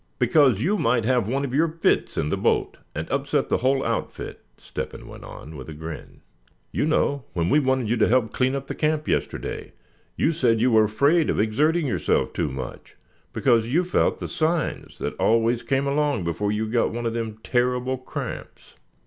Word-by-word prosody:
"Because 125 -3 +4
you 200 +6 +1
might 120 -6 +2
have 125 -4 +2
one 135 +4 0
of 130 - -5
your 160 +4 +3
fits 165 +1 0
in 75 - 0
the - - +1
boat, - - 0 0.2
and 80 +2 -3
upset 140 +1 0
the - - +2
whole 135 +2 +1
outfit," - - -4
Step - - -6
hen - - -10
went - - -11
on, 80 +1 -10
with 70 +1 -8
a 75 - -7
grin; 80 +1 -8 0.5
"you - - 0
know, 140 -4 +1
when 85 -2 0
we 150 - +5
wanted 130 -4 +1
you 120 +3 +1
to 110 - +4
help 120 -2 +2
clean 130 +1 +1
up 135 - -3
around - - -26
the - - -2
camp 155 -1 +1
yesterday, - - -3 0.4
you 165 - +2
said 120 -7 +2
you 125 +2 +3
were 110 -1 +5
afraid 140 +10 +2
of - - 0
exerting 150 +10 +2
yourself 90 - 0
too 80 -4 -1
much, 65 -1 -7 0.4
because 115 -4 +2
you 160 +9 +2
felt 180 - +1
the - - -5
signs 160 +1 -1
that - - -3
always 115 +1 +2
came 135 0 0
along 145 -5 +1
before 85 +5 -1
you 105 +1 -1
got 115 +2 +1
one 120 +1 -4
of 115 - 0
them 115 -2 -3
terrible 125 +1 0
cramps." 130 - -7
125 Hz, 200 wpm, -24 LUFS, 110-140 Hz, 0.5 s, we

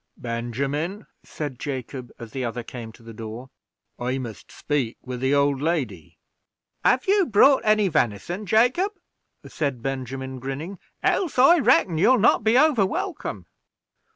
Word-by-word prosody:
"Benjamin," 135 - -3 0.2
said 145 -5 -6
Jacob, 130 -2 -5
as 115 -2 -10
the 130 +1 -4
other 120 0 -3
came 115 -1 -8
to 115 - -19
the 115 0 -10
door, 115 +4 -8 0.5
"I 125 +2 -1
must 120 -5 -8
speak 140 -6 -2
with 125 -1 -6
the 130 +2 +2
old 140 -1 +2
lady." 130 - -2 0.7
"Have 255 - +3
you 395 -2 +3
brought 260 +6 +5
any 215 -1 +3
venison, 155 - -1
Jacob?" 250 - +3 0.5
said 140 -6 -3
Benjamin, 130 0 -4
grinning, 140 +9 -6 0.2
"else, 345 -9 +1
I 280 +7 +7
reckon, 215 - +3
you'll 255 +9 +5
not 215 - +4
be 220 +3 +4
over 285 -7 +4
welcome." 190 - -3
140 Hz, 145 wpm, -24 LUFS, -, 0.7 s, I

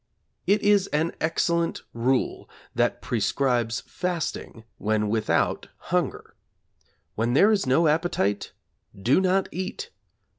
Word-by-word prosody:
It 205 +1 +3
is 205 -1 +4
an 155 +3 0
excellent 170 +1 0
rule 125 +3 0 0.2
that - - 0
prescribes 120 -4 0
fasting 170 -9 -4 0.2
when 105 0 0
without 110 0 0
hunger. - - -2 0.8
When 115 +4 0
there 205 +9 +6
is 200 -9 +1
no 155 +6 +4
appetite 150 - 0 0.5
do 125 - +3
not 190 +1 +2
eat. 185 +2 -5
150 Hz, 110 wpm, -25 LUFS, 115-180 Hz, 0.8 s, there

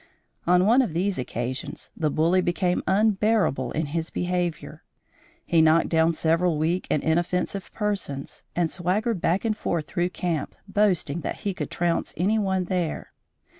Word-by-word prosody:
On 180 +1 +5
one 235 +6 +5
of 215 -11 -2
these 190 -1 0
occasions, 125 +1 -4
the 155 -2 0
bully 165 +5 +2
became 180 0 0
unbearable 200 - +2
in 160 +1 -1
his 160 +3 -3
behavior. 175 -2 -2 0.6
He 165 -1 +3
knocked 160 +1 +4
down 165 0 +3
several 165 +1 +1
weak 165 +4 0
and 150 - +1
inoffensive 175 +3 -1
persons, 200 -10 -3
and 170 -2 +1
swaggered 195 +3 0
back 180 +6 +1
and 220 -1 +1
forth 170 -6 -2
through 175 +1 -1
camp, 170 -5 -3
boasting 190 -6 +1
that - - -5
he 200 -2 -1
could - - -4
trounce 170 -1 -1
any 205 +6 +2
one 190 -2 0
there. 180 -3 -3
175 Hz, 155 wpm, -25 LUFS, 160-195 Hz, 0.6 s, On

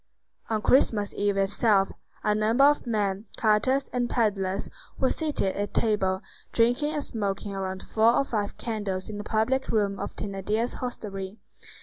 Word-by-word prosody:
On 215 -1 -1
Christmas 215 -6 +3
eve 205 -1 0
itself, 195 0 +3 0.3
a 210 - +3
number 220 +5 +3
of 290 -2 +4
men, 205 -2 0
carters, 230 +5 +2
and 245 -1 0
peddlers, 200 -4 0 0.3
were 260 - +2
seated 300 - 0
at 205 0 -3
table, 195 -4 +1 0.3
drinking 245 +6 +2
and 295 - -1
smoking 200 -4 -3
around 190 -1 -4
four 225 +2 +3
or - - +3
five 210 -6 -3
candles 205 -5 -3
in 205 -1 -5
the - - -4
public 220 +6 0
room 200 -3 +1
of - - -5
Thénardier's 210 +4 -2
hostelry. 200 -5 -5
210 Hz, 150 wpm, -27 LUFS, 195-235 Hz, 0.3 s, of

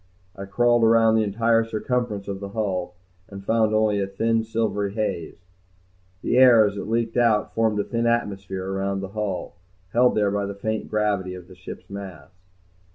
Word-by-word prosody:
I 100 - -7
crawled 120 +3 +2
around 115 0 +5
the 110 0 +3
entire 115 +2 +2
circumference 115 -2 -2
of 100 -1 -4
the 100 0 -6
hull 95 -4 -3 0.3
and 100 -1 -10
found 110 0 +2
only 110 -1 +2
a 100 - -1
thin 115 +3 0
silvery 110 -3 -2
haze. 90 -5 -4 0.8
The - - +1
air 120 -4 +7
as 100 -1 -2
it 100 - -5
leaked 115 +1 -1
out 115 -3 +2
formed 110 -2 +1
a - - +1
thin 115 0 -1
atmosphere 100 -5 -2
around 95 0 -2
the 95 - -6
hull, 100 -4 -4 0.4
held 125 +1 +4
there 105 -2 +2
by 100 0 -1
the 100 - -6
faint 110 +2 -3
gravity 100 -4 -1
of 90 -1 -11
the 95 - -13
ship's 90 0 -10
mass. 100 -2 -9
105 Hz, 180 wpm, -24 LUFS, 100-115 Hz, 0.8 s, air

